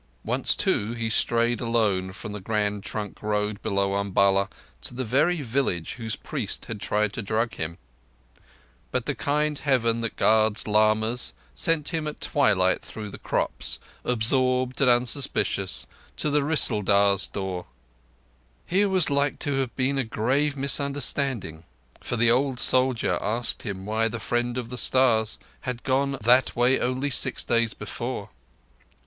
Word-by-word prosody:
Once, -, -, +1 dB
too, 105 Hz, +3 st, 0 dB
he 115 Hz, -1 st, -3 dB
strayed 115 Hz, +1 st, +1 dB
alone 105 Hz, -6 st, 0 dB
from 105 Hz, -, -8 dB
the 105 Hz, -, -6 dB
Grand 105 Hz, 0 st, -1 dB
Trunk 105 Hz, +1 st, -6 dB
Road 105 Hz, -1 st, -2 dB
below 100 Hz, -2 st, 0 dB
Umballa 100 Hz, 0 st, +2 dB, 0.3 s
to 125 Hz, -, -5 dB
the 130 Hz, -, -2 dB
very 150 Hz, +7 st, +1 dB
village 115 Hz, -9 st, -1 dB
whose 115 Hz, -3 st, -3 dB
priest -, -, -4 dB
had 105 Hz, -2 st, -7 dB
tried 105 Hz, -1 st, 0 dB
to 115 Hz, -, -3 dB
drug 110 Hz, +3 st, -1 dB
him; 80 Hz, +1 st, -4 dB, 1.1 s
but 125 Hz, -2 st, -2 dB
the 145 Hz, -, 0 dB
kind 150 Hz, +3 st, -1 dB
Heaven 115 Hz, -5 st, +1 dB
that 115 Hz, -, -3 dB
guards 110 Hz, 0 st, +2 dB
lamas 110 Hz, -, +2 dB, 0.2 s
sent 150 Hz, -, +1 dB
him 160 Hz, -3 st, -2 dB
at 150 Hz, -, -6 dB
twilight -, -, +2 dB
through 105 Hz, -2 st, -8 dB
the -, -, -9 dB
crops, -, -, -2 dB, 0.3 s
absorbed 125 Hz, +2 st, +1 dB
and 135 Hz, -, +5 dB
unsuspicious, 125 Hz, +3 st, +1 dB, 0.3 s
to 150 Hz, -, +1 dB
the 145 Hz, 0 st, +2 dB
Rissaldar's 100 Hz, -9 st, +3 dB
door. 95 Hz, -3 st, -5 dB, 1.0 s
Here 200 Hz, +3 st, +2 dB
was 185 Hz, -5 st, +2 dB
like 140 Hz, 0 st, +1 dB
to 140 Hz, -2 st, -1 dB
have 130 Hz, -3 st, -3 dB
been 135 Hz, +1 st, 0 dB
a -, -, +1 dB
grave 135 Hz, +6 st, 0 dB
misunderstanding, 140 Hz, -, -1 dB, 0.4 s
for -, -, -4 dB
the 115 Hz, 0 st, +4 dB
old 130 Hz, +1 st, +1 dB
soldier 130 Hz, -2 st, +3 dB
asked 115 Hz, +2 st, +1 dB
him 95 Hz, -4 st, -6 dB
why 110 Hz, +2 st, 0 dB
the 115 Hz, +1 st, -5 dB
Friend 120 Hz, +1 st, -1 dB
of 120 Hz, -1 st, -5 dB
the 125 Hz, -, -2 dB
Stars 115 Hz, -4 st, +3 dB, 0.2 s
had 120 Hz, -, -5 dB
gone 135 Hz, +1 st, 0 dB
that 125 Hz, +4 st, +4 dB
way 125 Hz, +2 st, +3 dB
only 130 Hz, +3 st, -1 dB
six -, -, +3 dB
days 115 Hz, -1 st, +1 dB
before. -, -, -5 dB
120 Hz, 150 wpm, -25 LUFS, 105-135 Hz, 1.1 s, and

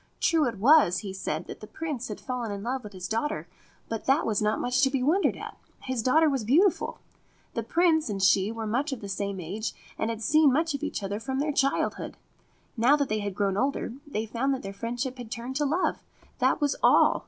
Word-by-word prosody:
True 320 Hz, -4 st, +3 dB
it 230 Hz, -3 st, -3 dB
was, 235 Hz, -, +5 dB
he 195 Hz, -, -4 dB
said, 175 Hz, -3 st, -3 dB
that -, -, -9 dB
the 215 Hz, -, -10 dB
Prince 295 Hz, -5 st, -4 dB
had 210 Hz, -, -6 dB
fallen 245 Hz, -4 st, -4 dB
in 200 Hz, 0 st, -5 dB
love 255 Hz, +2 st, -2 dB
with 210 Hz, -, -9 dB
his 185 Hz, 0 st, -6 dB
daughter; 220 Hz, -, -2 dB, 0.4 s
but 225 Hz, -1 st, -4 dB
that 275 Hz, +4 st, +3 dB
was 215 Hz, -2 st, 0 dB
not 215 Hz, +1 st, +1 dB
much 250 Hz, +1 st, +1 dB
to 270 Hz, -, +4 dB
be 265 Hz, -2 st, -1 dB
wondered 340 Hz, +9 st, +2 dB
at. -, -, -8 dB, 0.3 s
His 255 Hz, -3 st, -2 dB
daughter 315 Hz, +7 st, +4 dB
was 270 Hz, -5 st, 0 dB
beautiful; 325 Hz, -, +2 dB, 0.6 s
the -, -, -1 dB
Prince 325 Hz, -5 st, +2 dB
and 200 Hz, -2 st, -3 dB
she 195 Hz, +1 st, +3 dB
were 225 Hz, -1 st, -5 dB
much 260 Hz, +8 st, -1 dB
of 265 Hz, -, -5 dB
the 200 Hz, -, -6 dB
same 200 Hz, 0 st, -3 dB
age, 200 Hz, +7 st, -4 dB, 0.3 s
and 220 Hz, -, 0 dB
had 225 Hz, -1 st, -4 dB
seen 305 Hz, +4 st, +5 dB
much 320 Hz, +4 st, +1 dB
of 280 Hz, -, -4 dB
each 300 Hz, -8 st, -3 dB
other 200 Hz, +2 st, -3 dB
from 265 Hz, +3 st, -3 dB
their 295 Hz, +2 st, 0 dB
child 275 Hz, 0 st, +1 dB
hood. -, -, -7 dB, 0.6 s
Now 245 Hz, +5 st, +5 dB
that 285 Hz, -2 st, -1 dB
they 215 Hz, -, 0 dB
had 200 Hz, -2 st, -4 dB
grown 200 Hz, -1 st, 0 dB
older, 265 Hz, -1 st, -1 dB
they 220 Hz, -6 st, -2 dB
found 255 Hz, +5 st, 0 dB
that 260 Hz, -, -8 dB
their 195 Hz, 0 st, -6 dB
friendship 245 Hz, +5 st, -4 dB
had 240 Hz, -3 st, -7 dB
turned 245 Hz, +3 st, -5 dB
to 295 Hz, -, +1 dB
love. 325 Hz, +6 st, 0 dB, 0.4 s
That -, -, +2 dB
was 290 Hz, -2 st, +1 dB
all. -, -, +5 dB
245 Hz, 235 wpm, -27 LUFS, 210-280 Hz, 0.6 s, was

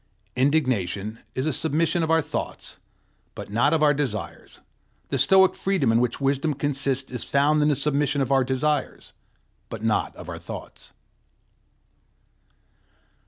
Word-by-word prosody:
Indignation 115 Hz, -, 0 dB, 0.2 s
is 130 Hz, -, -1 dB
a 155 Hz, -, 0 dB
submission 165 Hz, +3 st, 0 dB
of 160 Hz, -, -1 dB
our 160 Hz, -1 st, +3 dB
thoughts, -, -, -6 dB, 0.6 s
but -, -, -8 dB
not 120 Hz, +7 st, +2 dB
of 160 Hz, -2 st, +2 dB
our 145 Hz, -1 st, +5 dB
desires; 135 Hz, -8 st, -5 dB, 0.5 s
the 135 Hz, -, -1 dB
Stoic 190 Hz, +6 st, +5 dB
freedom 190 Hz, -12 st, 0 dB
in 115 Hz, -, +3 dB
which 125 Hz, -1 st, -1 dB
wisdom 140 Hz, +2 st, 0 dB
consists 135 Hz, -1 st, -1 dB
is 125 Hz, -3 st, -3 dB
found 145 Hz, +2 st, +2 dB
in 150 Hz, -, +3 dB
the 150 Hz, -, +3 dB
submission 145 Hz, 0 st, 0 dB
of 135 Hz, -1 st, -1 dB
our 135 Hz, -1 st, +4 dB
desires, 135 Hz, +3 st, -2 dB, 0.6 s
but -, -, -7 dB
not -, -, 0 dB
of -, -, -10 dB
our -, -, -6 dB
thoughts. -, -, -10 dB
140 Hz, 145 wpm, -24 LUFS, 130-150 Hz, 0.6 s, our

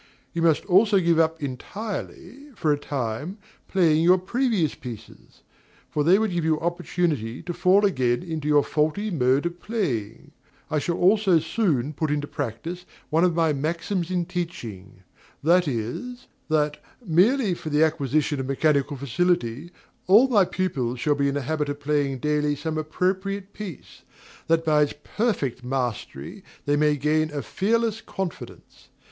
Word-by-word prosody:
You 170 Hz, -, -2 dB
must 165 Hz, -2 st, +3 dB
also 200 Hz, +2 st, +4 dB
give 170 Hz, -2 st, +2 dB
up 160 Hz, -1 st, +1 dB
entirely, 210 Hz, -, -6 dB
for 155 Hz, -6 st, +1 dB
a 145 Hz, -, -2 dB
time, 140 Hz, -, -4 dB, 0.3 s
playing 165 Hz, -5 st, +3 dB
your 180 Hz, +2 st, +6 dB
previous 200 Hz, -, 0 dB
pieces; 115 Hz, -4 st, -11 dB, 0.5 s
for 150 Hz, -, 0 dB
they 175 Hz, +5 st, +5 dB
would 220 Hz, -1 st, 0 dB
give 175 Hz, -2 st, -1 dB
you 160 Hz, -1 st, +1 dB
opportunity 170 Hz, -8 st, -2 dB
to 175 Hz, +1 st, -4 dB
fall 190 Hz, +4 st, +4 dB
again 130 Hz, -8 st, +1 dB
into 160 Hz, -4 st, -4 dB
your 145 Hz, -1 st, +4 dB
faulty 155 Hz, +8 st, 0 dB
mode 135 Hz, -2 st, +2 dB
of 175 Hz, 0 st, -3 dB
playing. 125 Hz, -, -3 dB, 0.4 s
I 155 Hz, -, +2 dB
shall 170 Hz, +4 st, -2 dB
also 195 Hz, -1 st, +4 dB
soon 155 Hz, -, 0 dB
put 155 Hz, +1 st, -2 dB
in 150 Hz, 0 st, +1 dB
practice 145 Hz, +6 st, -5 dB, 0.2 s
one 160 Hz, +2 st, +3 dB
of 180 Hz, -2 st, +3 dB
my 165 Hz, -2 st, +2 dB
maxims 170 Hz, +5 st, -2 dB
in 180 Hz, -2 st, 0 dB
teaching; 110 Hz, -, -6 dB, 0.4 s
viz., 170 Hz, -, 0 dB, 0.2 s
that, 150 Hz, -1 st, +1 dB, 0.2 s
merely 200 Hz, -, +3 dB
for 160 Hz, -, -6 dB
the 150 Hz, +1 st, +3 dB
acquisition 150 Hz, -1 st, 0 dB
of 130 Hz, -, -3 dB
mechanical 140 Hz, 0 st, +1 dB
facility, 140 Hz, 0 st, 0 dB, 0.4 s
all 215 Hz, +8 st, +7 dB
my 210 Hz, -7 st, +4 dB
pupils 135 Hz, -11 st, -2 dB
shall 150 Hz, +2 st, +2 dB
be 140 Hz, -1 st, +1 dB
in 140 Hz, -, -1 dB
the 145 Hz, -, -1 dB
habit 150 Hz, +2 st, -2 dB
of 145 Hz, 0 st, -4 dB
playing 145 Hz, -2 st, 0 dB
daily 150 Hz, +2 st, 0 dB
some 155 Hz, +2 st, -3 dB
appropriate 190 Hz, +5 st, -2 dB
piece, 195 Hz, -8 st, -9 dB, 0.5 s
that 165 Hz, 0 st, +2 dB
by 150 Hz, -1 st, +4 dB
its 145 Hz, -, +1 dB
perfect 170 Hz, -, -1 dB
mastery 125 Hz, -, -4 dB, 0.2 s
they 145 Hz, -, +2 dB
may 150 Hz, 0 st, +2 dB
gain 155 Hz, +2 st, +1 dB
a 145 Hz, -2 st, -4 dB
fearless 225 Hz, +2 st, 0 dB
confidence. 190 Hz, -4 st, -7 dB
160 Hz, 155 wpm, -24 LUFS, 145-180 Hz, 0.5 s, all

